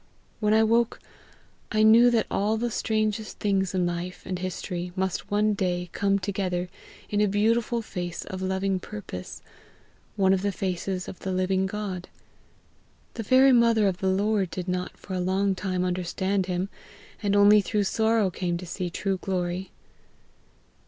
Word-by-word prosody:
When 210 0 +3
I 220 - +5
woke, 230 +1 +2 0.7
I 215 0 +3
knew 230 +3 +7
that 230 -2 +2
all 210 +2 +1
the 235 +1 -1
strangest 215 0 -1
things 195 -2 0
in 180 -1 +2
life 175 +1 -4
and 185 -1 -3
history 180 -1 -4
must 190 -1 -2
one 210 +1 +2
day 180 -3 -2
come 200 0 +2
together 185 -2 -2 0.4
in 205 0 +2
a 210 - +4
beautiful 225 +3 +1
face 175 -4 -5
of 190 -2 -6
loving 190 0 0
purpose, 185 - -8 0.7
one 190 -2 +4
of 190 - +1
the 200 0 0
faces 185 0 -3
of 185 - -8
the 190 - -4
living 185 +1 +1
God. 195 -3 -5 1.0
The 230 - -4
very 260 +5 +5
mother 230 -4 +4
of 185 -2 -1
the 190 - +1
Lord 200 0 +1
did 180 +1 -5
not 180 0 -3
for 190 - -8
a 185 - -1
long 190 +2 +1
time 185 -1 -2
understand 185 +2 -1
him, 180 +1 -2 0.5
and 205 -1 +1
only 205 +1 +7
through 205 +1 0
sorrow 220 -1 +2
came 175 -1 -2
to 180 - -7
see 180 +1 -4
true 195 +2 -2
glory. 180 0 -3
195 Hz, 165 wpm, -26 LUFS, 185-210 Hz, 1.0 s, knew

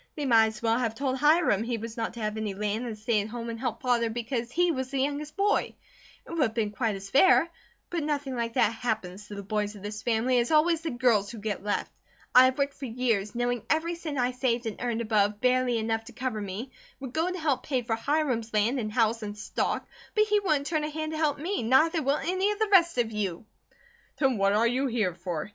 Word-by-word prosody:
They 295 - -3
might 225 -4 +5
as 220 +1 -7
well 230 +1 +2
have 230 -3 -1
told 265 +1 -1
Hiram 300 - +4
he 235 +1 -2
was 225 +1 -7
not 230 -1 -3
to 235 - -7
have 215 0 -2
any 215 -3 -3
land 210 +4 -2
and 220 -2 -5
stay 215 0 +1
at 205 - -5
home 230 +1 -5
and 230 - -7
help 240 -2 -3
Father 240 -2 +2
because 235 +1 -3
he 350 +4 +2
was 260 -4 -3
the 275 - -3
youngest 290 +2 -2
boy; 405 +1 +1 0.5
it - - -11
would 335 -2 -1
have 225 -5 +2
been 215 -3 0
quite 220 -1 -1
as 195 0 -9
fair; 335 +3 +6 0.4
but 345 -2 -1
nothing 285 -3 -2
like 230 -1 -2
that 220 - +3
happens 210 -4 -4
to 205 - -8
the 200 - -6
boys 210 +1 -2
of 200 - -12
this 210 0 -5
family, 240 +2 +1
it - - +4
is 235 - -2
always 320 +1 +3
the 325 - -3
girls 240 -6 +2
who 235 - -8
get 205 -2 -4
left. 205 0 -2 0.4
I 255 +1 +9
have 260 0 +1
worked 280 0 0
for 275 - -7
years, 225 -3 -1
knowing 245 -1 0
every 325 +2 +1
cent 320 -4 -5
I 250 0 +1
saved 250 -1 -1
and 220 - -5
earned 235 -1 -1
above 210 -2 +1
barely 250 -1 +2
enough 225 0 -1
to - - -11
cover 250 -4 -3
me, 205 +6 -5 0.3
would 265 -2 -7
go 325 +3 +1
to 365 - -4
help 305 -6 0
pay 260 -4 -1
for 225 -1 -1
Hiram's 240 -3 -1
land 225 +6 +2
and 215 -3 -3
house 225 0 +1
and 210 -1 -6
stock; 215 - -2 0.3
but 425 - +5
he 420 -1 +2
wouldn't 305 -8 0
turn 310 -1 0
a 300 - -2
hand 310 +1 -4
to 315 - -4
help 300 -3 +1
me, 345 +5 -2
neither 310 +8 +3
will 280 +1 +1
any 370 +5 0
of 420 - -3
the 435 -1 0
rest 340 -6 +5
of 235 -2 +1
you." 205 -3 -3 0.7
"Then 265 -6 +1
what 195 0 +3
are 220 +3 +3
you 255 +4 +1
here 220 -7 0
for?" 170 -3 -4
240 Hz, 250 wpm, -28 LUFS, 220-285 Hz, 0.7 s, I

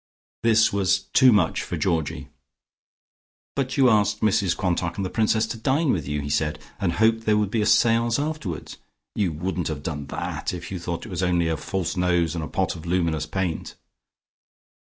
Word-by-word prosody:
This 110 -2 +4
was 95 -1 +2
too 130 -1 +7
much 100 -7 +2
for - - -4
Georgie. 80 -3 -1 1.3
"But 135 -1 -2
you 135 -2 +6
asked 105 -2 +2
Mrs 100 -4 +2
Quantock 85 -2 -1
and 100 - -1
the 90 - -4
Princess 110 0 +2
to 110 +1 -5
dine 135 +5 +2
with 80 -7 -2
you," 75 0 -2
he 70 - -5
said, 75 0 0 0.2
"and 90 -5 0
hoped 115 +3 +2
there 105 0 +4
would 105 -2 0
be 110 - +1
a 105 - +1
seance 115 +1 +3
afterwards. 145 - -4 0.4
You 100 -5 0
wouldn't 90 +2 -3
have 75 -2 -4
done 75 -3 -4
that, 80 - -4
if 85 0 -8
you 95 - -4
thought 85 +2 -4
it - - -9
was 90 -2 -3
only 90 -2 +2
a 80 - 0
false 90 +3 -3
nose 90 -3 +1
and 85 -2 -3
a - - -4
pot 95 -1 -1
of 85 0 -9
luminous 85 -4 0
paint." 90 0 -3
95 Hz, 195 wpm, -24 LUFS, 85-110 Hz, 1.3 s, too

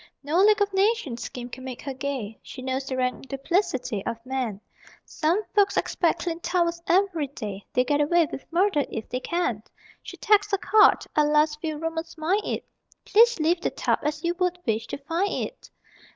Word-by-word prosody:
No 305 +5 +1
League 415 0 +5
of 400 -1 -4
Nations 385 - +1
scheme 245 -1 -6
can 255 +1 -9
make 255 -2 -7
her 275 - -4
gay 260 -6 -4
She 255 - -10
knows 265 +1 -2
the 260 - -3
rank 255 +1 -1
duplicity 275 - -1
of 230 - -3
man; 255 -6 -2 0.5
Some 335 +7 0
folks 405 -1 +3
expect 340 -1 +1
clean 335 -1 -3
towels 340 -1 0
every 355 -5 +2
day, 205 -7 -7
They'll 250 - +2
get 290 +2 +2
away 335 +3 +4
with 275 - -8
murder 355 -3 +2
if 220 - -5
they 255 - -2
can! 255 - -1 0.4
She - - -10
tacks 415 0 +3
a - - +4
card 425 +1 +5
(alas, 300 0 +3
few 310 -1 -4
roomers 325 +1 -4
mind 355 +7 +1
it) - - -3 0.4
_Please 465 0 +5
leave 335 +3 +2
the - - 0
tub - - 0
as 300 +1 -2
you 340 0 +1
would 360 -1 +1
wish 225 0 -1
to - - -5
find 330 +8 -1
it! - - -12
310 Hz, 190 wpm, -25 LUFS, 260-360 Hz, 0.5 s, League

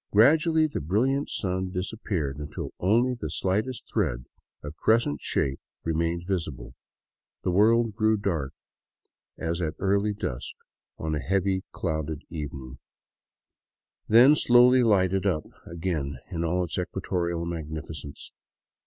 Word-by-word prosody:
Gradually 155 +8 +5
the 150 - -3
brilliant 125 - +1
sun 95 -1 -2
disappeared, 90 - -3
until 75 0 -6
only 115 +7 +3
the 115 -11 -5
slightest 105 - -1
thread, 70 - -1 0.4
of 75 +1 -7
crescent 110 -6 +2
shape, 65 -1 -1 0.2
remained 85 +1 -1
visible; 80 -10 -3 0.7
the 90 - +1
world 110 +4 +4
grew 110 0 +3
dark 85 -9 -2 0.9
as 85 +2 -2
at 80 -2 -2
early 100 +2 +1
dusk 60 - -5 0.4
on 80 -1 -3
a 75 - 0
heavily 95 +2 0
clouded 80 -3 -3
evening, 70 -5 -6 1.3
then 125 +7 +7
slowly 125 -1 +6
lighted 95 -4 +3
up 80 -5 0 0.2
again 80 -6 -3
in 85 - -2
all 90 +2 +1
its 85 +1 -3
equatorial 85 -2 -2
magnificence. 80 -3 -6
90 Hz, 120 wpm, -27 LUFS, 80-110 Hz, 1.3 s, then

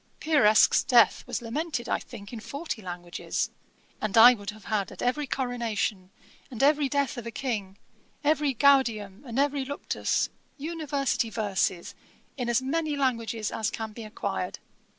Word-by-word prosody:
Pieresc's 270 -10 +5
death 240 -3 +5
was - - -3
lamented, 250 +1 -3
I - - 0
think, 215 -2 -11
in 230 - -5
forty 280 +1 -5
languages. 175 -2 -4 0.5
And 215 0 -1
I 240 +3 +10
would 205 -4 -7
have 210 -1 -9
had 210 -3 -1
at - - -7
every 275 +4 0
coronation, 230 -7 -2 0.4
and 245 0 -3
every 290 -1 +4
death 280 -3 0
of 235 - -8
a - - -2
King, 215 -7 -4 0.5
every 295 -2 +2
Gaudium, 230 -7 +3
and 235 +1 -5
every 280 0 +2
Luctus, 285 +2 -1 0.3
University 285 -6 -1
verses, 200 -5 -1 0.4
in 245 -3 -3
as 240 +2 +2
many 305 +2 -1
languages 230 -5 -1
as 220 - -1
can 220 -1 -5
be 230 - -8
acquired. 215 0 -4
240 Hz, 150 wpm, -27 LUFS, 215-280 Hz, 0.5 s, I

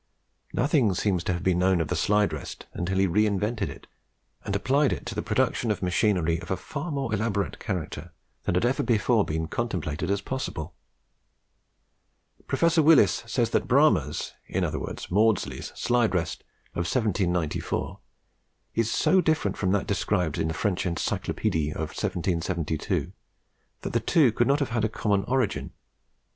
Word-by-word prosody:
Nothing 125 - +2
seems 90 -3 0
to 90 - +1
have 85 - -4
been 90 -2 +2
known 95 0 +3
of 80 - 0
the - - 0
slide 105 -4 +2
rest 75 - -7
until 90 +2 -2
he 95 - +4
re 105 +4 +3
invented 105 +1 -1
it - - -10 0.6
and 100 - -2
applied 135 +7 +2
it - - -4
to - - -4
the - - -2
production 120 - 0
of 105 -3 -1
machinery 90 -3 +2
of - - -10
a 95 - 0
far 150 +3 -5
more 135 -6 -2
elaborate 100 -5 -1
character 85 -2 -4 0.3
than - - -1
had 90 - +2
ever 125 +3 +1
before 115 -1 +2
been 80 -1 -2
contemplated 90 -5 -3
as 100 0 +1
possible. 100 - -4 1.7
Professor 170 -1 +3
Willis 150 - +5
says 115 -1 0
that - - +1
Bramah's, 125 - +2
in - - -1
other - - -1
words - - -6
Maudslay's, 105 +1 +1
slide 120 -5 +1
rest 85 -2 -2 0.3
of 85 -1 -2
1794 90 - -1 0.7
is 115 -1 +1
so 190 0 +3
different 155 - +1
from 95 - -1
that 100 0 +1
described 90 -5 0
in - - +1
the 80 - -3
French 100 0 0
'Encyclopedie 80 -3 -1
in - - -6
1772, 85 -1 -2 0.7
that - - -5
the - - +3
two 145 -8 +4
could 120 +2 +1
not 140 - +4
have 140 -2 -1
had 115 -2 -1
a 110 - +2
common 105 -2 0
origin. 130 -4 -1
100 Hz, 165 wpm, -26 LUFS, 90-120 Hz, 1.7 s, Willis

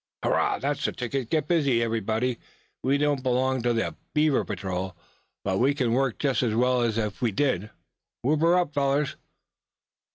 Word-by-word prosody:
"Hurrah! - - +2
that's - - -2
the - - 0
ticket! 125 0 -3
Get 155 -2 0
busy 140 -9 +2
everybody. 115 +2 -1 0.4
We 135 +2 +2
don't 145 -2 +1
belong 130 0 +1
to 120 +1 +1
the 115 -1 -1 0.2
Beaver 150 -2 +3
Patrol, 95 -2 -4 0.5
but 95 -1 0
we 135 +4 +3
can 125 -5 +1
work 130 -2 +1
just 140 -3 +1
as 115 -4 0
well 125 +1 +3
as 115 -2 0
if 105 0 -2
we 120 -3 +2
did. 110 -3 0 0.5
Whoop 150 +4 +2
her 170 +2 +5
up, 175 -5 0
fellers!" 140 0 +1
125 Hz, 170 wpm, -26 LUFS, 115-140 Hz, 0.5 s, her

